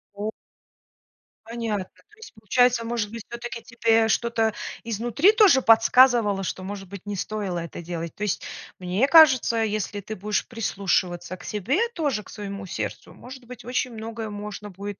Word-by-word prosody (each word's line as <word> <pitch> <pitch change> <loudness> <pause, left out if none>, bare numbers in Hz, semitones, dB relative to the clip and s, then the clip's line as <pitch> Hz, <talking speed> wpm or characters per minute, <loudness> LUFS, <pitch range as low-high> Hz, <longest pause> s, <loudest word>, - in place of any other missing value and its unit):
О. 205 +2 -3 1.2
Понятно. 225 -4 -3
То 420 - -26
есть 445 - -12
получается, 235 +3 +2
может 230 -3 -2
быть, 230 -1 -7
все-таки 235 -1 -6
тебе 225 -1 +2
что-то 225 -1 +1 0.3
изнутри 235 - +2
тоже 420 - +5
подсказывало, 225 -3 +5
что, 185 0 -4
может 195 0 -7
быть, 200 0 -10
не 205 0 -4
стоило 195 -2 -3
это 170 0 -7
делать? 170 -1 -5
То 210 - -5
есть 210 - -1 0.4
мне 185 +8 +1
кажется, 280 -7 +6
если 210 -1 -2
ты 215 +2 -6
будешь 210 +1 -1
прислушиваться 185 -5 -1
к - - -14
себе 215 - -1 0.2
тоже, 285 -10 -1
к - - -16
своему 200 -1 -7
сердцу, 110 - -5
может 255 0 -12
быть, 245 0 -11
очень 250 0 -1
многое 225 0 -6
можно 210 0 -7
будет 200 +1 -7
215 Hz, 160 wpm, -24 LUFS, 200-240 Hz, 1.2 s, кажется